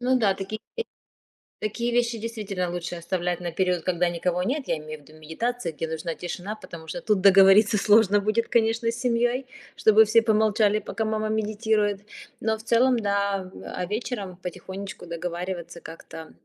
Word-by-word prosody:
Ну 255 +1 +2
да, 200 -4 +3
такие 195 +3 -6 1.0
такие 235 +3 -2
вещи, 235 -1 +1
действительно, 205 -5 -3
лучше 175 0 -4
оставлять 175 0 -2
на 175 -1 -4
период, 180 -1 0
когда 175 -1 +1
никого 175 +1 -1
нет. 270 +6 -2
Я - - 0
имею 155 0 -8
в - - -21
виду 155 +1 -16
медитация, 180 +5 -3
где 160 - -4
нужна 160 +1 -4
тишина, 180 +4 -5
потому 165 -6 -11
что 260 - -5
тут 210 -5 +1
договориться 195 +2 +6
сложно 205 0 +5
будет, 215 +3 0
конечно, 230 0 +2
с - - -6
семьей, 245 +1 0 0.3
чтобы 220 0 +6
все 225 +2 +5
помолчали, 215 -1 +3
пока 220 - -4
мама 215 0 -1
медитирует. 215 -1 0 0.4
Но, 220 0 0
в - - -12
целом, 240 +1 +3
да, 200 -2 -1 0.2
а 180 - -2
вечером 205 -4 -4
потихонечку 190 +1 -7
договариваться 175 0 -5
как-то 160 -1 -10
200 Hz, 165 wpm, -25 LUFS, 180-220 Hz, 1.0 s, договориться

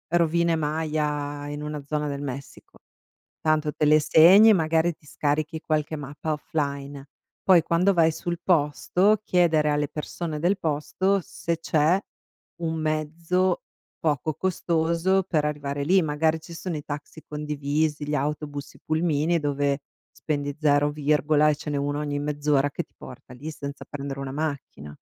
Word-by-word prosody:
rovine 170 0 +2
Maya 150 -2 -2
in 145 0 -5
una 150 -1 -4
zona 150 0 -2
del 140 0 -4
Messico. 140 0 -8 0.6
Tanto 155 -1 +1
te 150 - 0
le 155 +1 +6
segni 185 +9 +7
e - - +8
magari 165 -1 +2
ti - - -30
scarichi 150 +2 -1
qualche 155 -1 -1
mappa 145 +2 -4
offline. 140 -2 -4 0.4
Poi 180 -4 +6
quando 175 +4 +2
vai 165 -2 +4
sul 175 +1 -4
posto, 180 +5 +2
chiedere 160 -4 +3
alle 145 0 +1
persone 155 +1 -5
del 190 +4 +2
posto 185 +5 0
se 170 -4 -3
c'è 165 +3 +2 0.6
un 160 0 -1
mezzo 165 +4 0 0.4
poco 155 -1 0
costoso 170 +1 +1
per 155 -5 0
arrivare 145 -1 -2
lì. 185 +3 +4
Magari 155 +1 +1
ci 170 +1 -11
sono 170 -1 -4
i 145 - -5
taxi 145 +2 -7
condivisi, 150 0 -2
gli 150 - 0
autobus, 145 0 -4
i - - -19
pulmini 160 +1 +1
dove 145 -1 0 0.3
spendi 145 -2 -3
0 145 -1 +3
virgola, 150 +1 +2
e - - +2
ce 150 - -6
n'è 145 - -1
uno 145 +1 -1
ogni 145 -1 -2
mezz'ora 145 -1 +1
che - - -3
ti - - -42
porta - - -12
lì 145 +6 -8
senza 140 -1 -7
prendere 140 -1 -5
una 135 -1 -5
macchina. 140 - -4
150 Hz, 155 wpm, -25 LUFS, 145-165 Hz, 0.6 s, e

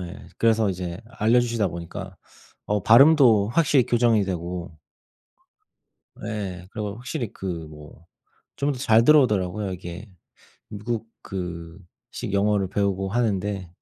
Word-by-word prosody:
네 90 +2 -9
그래서 110 -2 +2
이제 90 -2 -4
알려주시다 115 -2 +1
보니까 90 +3 -8 0.5
어 105 -2 0
발음도 120 -4 +6
확실히 135 -1 +3
교정이 115 -4 +3
되고 90 -2 -5 1.5
예. 100 -5 -5
그리고 105 -1 -5
확실히 125 -1 -5
그 95 - -8 0.2
뭐 75 +2 -14 0.5
좀 145 +1 0
더 130 - -7
잘 115 -3 +4
들어오더라고요. 105 -9 +3
이게 90 +3 -8 0.6
미국 110 +2 -4 0.2
그 85 -2 -6 0.4
식 - - -4
영어를 100 -1 +1
배우고 95 0 -1
하는데 100 -4 -1
105 Hz, 260 characters per minute, -24 LUFS, 90-115 Hz, 1.5 s, 발음도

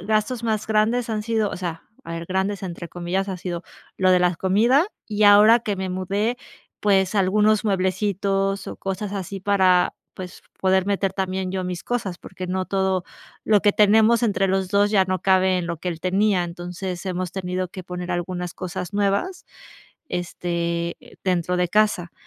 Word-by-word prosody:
gastos 215 +5 0
más 220 -2 -1
grandes 220 +3 +1
han 215 -1 -1
sido 220 -1 0
o - - -5
sea, 170 -3 -5 0.2
a 165 - -8
ver 165 0 -6
''grandes'' 190 +2 -1
entre 170 -2 -6
comillas, 180 +3 -2
ha 190 - -3
sido 175 -1 -5 0.3
lo 185 -1 +3
de 180 - +5
la 180 0 +2
comida. 230 - +3 0.2
Y 215 -1 -1
ahora 210 +3 +7
que 210 -3 -2
me 190 0 -3
mudé, 200 +6 -1 0.4
pues, 195 -1 +2
algunos 210 +2 +3
mueblecitos 195 0 0
o - - -6
cosas 195 +1 -4
así 195 0 -5
para, 185 -2 +3 0.2
pues, 185 -1 -9 0.2
poder 190 0 +2
meter 195 -1 0
también 190 -1 -2
yo 190 -1 -2
mis 180 -1 -4
cosas, 200 -8 -3
porque 185 0 -8
no 185 +1 -1
todo 190 -2 0 0.4
lo 210 -2 +4
que 205 0 +3
tenemos 220 +3 +4
entre 200 -3 +1
los 190 -1 0
2 205 +1 +3
ya 195 -3 +4
no 185 -1 -2
cabe 190 -1 +3
en 175 - -3
lo 170 - -2
que 180 - -4
él 165 -2 -4
tenía. 190 +1 +2
Entonces, 175 +2 -6
hemos 185 -1 -2
tenido 185 -1 -3
que 185 - -8
poner 180 0 -6
algunas 175 0 -3
cosas 180 -1 -5
nuevas, 205 - 0 0.7
este, 170 -1 -2 0.3
dentro 180 -1 0
de 180 -1 +1
casa. 210 -4 +1
190 Hz, 180 wpm, -23 LUFS, 180-205 Hz, 0.7 s, ahora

